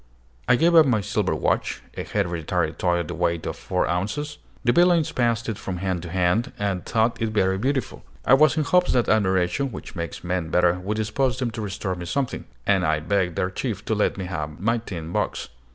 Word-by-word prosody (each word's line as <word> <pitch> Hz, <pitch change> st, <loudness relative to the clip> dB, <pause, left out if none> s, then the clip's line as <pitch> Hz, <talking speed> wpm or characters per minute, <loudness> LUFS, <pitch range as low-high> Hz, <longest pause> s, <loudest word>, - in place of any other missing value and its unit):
I -, -, +6 dB
gave 165 Hz, +6 st, +3 dB
up 160 Hz, -3 st, +7 dB
my 120 Hz, -4 st, +3 dB
silver 100 Hz, -4 st, -1 dB
watch, -, -, -1 dB
a -, -, -4 dB
hereditary 85 Hz, -6 st, -1 dB
toy 90 Hz, -1 st, +1 dB
of 85 Hz, -2 st, -2 dB
the -, -, -4 dB
weight 85 Hz, -1 st, -1 dB
of -, -, -3 dB
four -, -, -1 dB
ounces. 105 Hz, +13 st, -2 dB, 0.2 s
The 120 Hz, -, +4 dB
villains 175 Hz, 0 st, +4 dB
passed 120 Hz, -2 st, 0 dB
it 110 Hz, -3 st, -3 dB
from 95 Hz, -2 st, -4 dB
hand 90 Hz, -1 st, -2 dB
to 85 Hz, -, -7 dB
hand, 90 Hz, +6 st, +1 dB
and 100 Hz, -3 st, -1 dB
thought 115 Hz, +1 st, 0 dB
it 115 Hz, -, +1 dB
very 95 Hz, -3 st, +1 dB
beautiful. 130 Hz, +2 st, -2 dB, 0.2 s
I -, -, +5 dB
was 155 Hz, +3 st, +5 dB
in 155 Hz, -, +2 dB
hopes 180 Hz, +4 st, +3 dB
that 125 Hz, -2 st, +2 dB
admiration, 95 Hz, +4 st, +2 dB
which 95 Hz, -, -9 dB
makes 85 Hz, -3 st, -5 dB
men 90 Hz, -2 st, -2 dB
better, 90 Hz, +1 st, +3 dB
would 100 Hz, +4 st, -3 dB
dispose 110 Hz, +3 st, 0 dB
them 125 Hz, -2 st, -1 dB
to 110 Hz, 0 st, -5 dB
restore 100 Hz, -2 st, -3 dB
me 90 Hz, -1 st, -6 dB
something, 135 Hz, +7 st, -2 dB, 0.2 s
and 95 Hz, -2 st, +3 dB
I 80 Hz, -2 st, +2 dB
begged 90 Hz, +1 st, 0 dB
their 90 Hz, +2 st, -1 dB
chief 105 Hz, -2 st, -4 dB
to -, -, 0 dB
let 105 Hz, -1 st, +1 dB
me 95 Hz, -, -4 dB
have 75 Hz, -4 st, -5 dB
my 115 Hz, +5 st, +1 dB
tin 85 Hz, -7 st, -7 dB
box. -, -, -2 dB
100 Hz, 215 wpm, -24 LUFS, 90-120 Hz, 0.2 s, up